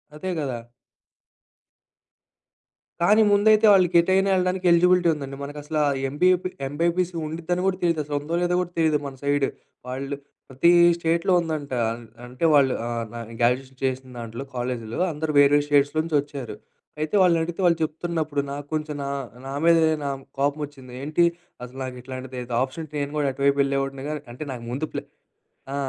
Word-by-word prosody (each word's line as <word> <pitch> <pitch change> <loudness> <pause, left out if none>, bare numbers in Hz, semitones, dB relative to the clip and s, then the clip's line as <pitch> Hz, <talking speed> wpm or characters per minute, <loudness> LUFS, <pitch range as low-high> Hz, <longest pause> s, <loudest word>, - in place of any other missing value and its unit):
అదే 185 +5 -5
గదా! 135 -5 -2 2.4
కానీ 210 +6 +5
ముందైతే 215 +2 +5
వాళ్ళకి 185 -3 +4
ఎటైనా 190 +3 +2
ఎళ్ళడానికి 185 0 0
ఎలిజిబిలిటీ 180 +1 +4
ఉందండి. 140 -2 -6
మనకసల 150 +2 -5 0.3
ఎంబైపి 180 +5 +2 0.2
ఎంబైపీసీ 170 +5 0
ఉండిద్దని 170 +3 -2
కూడా 190 -1 +1
తెలీదసలు 155 -4 0
ఉందో 155 +4 -3
లేదో 180 0 +1
కూడా 175 -1 -5
తెలీదు 160 -2 +3
మన 135 -1 -6
సైడ్. 145 -1 +2 0.4
వాళ్ళు 135 +2 -4 0.3
ప్రతి 135 +6 +4 0.3
స్టేట్‌లో 170 +2 +1
ఉందంట. 155 -4 -4 0.2
అన్ 120 +1 -7 0.2
అంటే 125 +6 -3
వాళ్ళు 140 -3 +5
ఆహ్, 120 -1 -2
నా 120 - -6 0.2
గ్రాడ్యుయేషన్ 130 +2 0
చేసిన 130 0 -2
దాంట్లో 115 +2 -6
కాలేజీలో 120 -2 -3
అందరూ 155 0 -3
వేరే 145 +1 +6
స్టేట్స్ 145 -1 +3
నుంచొచ్చారు. 145 -5 -1 0.4
అయితే 155 +5 -1
వాళ్ళనడిగితే 170 -1 +2
వాళ్ళు 170 -2 +4
చెప్తున్నప్పుడు 155 -2 -2
నాకు 145 0 -5
కొంచెం, 155 -1 -2
నా 140 - -3 0.4
నా - - -5
మీదే 165 -1 +5 0.2
నాకు 135 -1 -3 0.2
కోపమోచ్చింది. 140 -2 -3
ఏంటి 155 +4 +1 0.4
అసలు 125 +1 -10
నాకిట్లాంటిది 130 0 -7 0.2
ఆప్షన్ 140 +5 -3
నేను 145 -1 -2
గూడా 145 -1 +1
అటువైపు 140 +1 +2
ఎళ్ళేవాడిని 135 0 -2
కానీ, 150 -1 -4
అంటే 125 - -6
నాకు 120 -2 -8
ముందు 140 +5 -2
ప్లాన్, - - -5 0.6
ఆ! - - -2
145 Hz, 145 wpm, -24 LUFS, 135-170 Hz, 2.4 s, వేరే